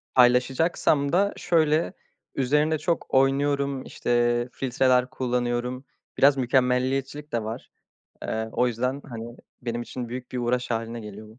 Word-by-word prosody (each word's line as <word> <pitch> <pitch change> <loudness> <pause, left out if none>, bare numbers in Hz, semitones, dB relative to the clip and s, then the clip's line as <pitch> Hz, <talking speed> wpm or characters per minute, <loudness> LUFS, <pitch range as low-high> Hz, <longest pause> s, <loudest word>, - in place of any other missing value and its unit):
paylaşacaksam 135 +4 +3
da 200 +3 +2
şöyle: 160 -2 +2 0.4
Üzerinde 150 +4 +2
çok 170 +3 -2
oynuyorum, 140 0 +2
işte, 120 0 +1
filtreler 130 0 +2
kullanıyorum. 125 +1 -2 0.3
Biraz 140 0 +5
mükemmeliyetçilik 130 +3 0
de 115 -2 0
var. 115 +3 -6 0.5
Eee, 110 0 -2
o 125 - +2
yüzden, 125 +4 -2
hani, 115 0 -7 0.3
benim 120 0 -3
için 120 0 -6
büyük 125 +1 -7
bir 125 - -2
uğraş 125 +1 -1
hâline 115 0 -3
geliyor 105 0 -10
bu. 110 +3 -17
125 Hz, 130 wpm, -25 LUFS, 120-140 Hz, 0.5 s, Biraz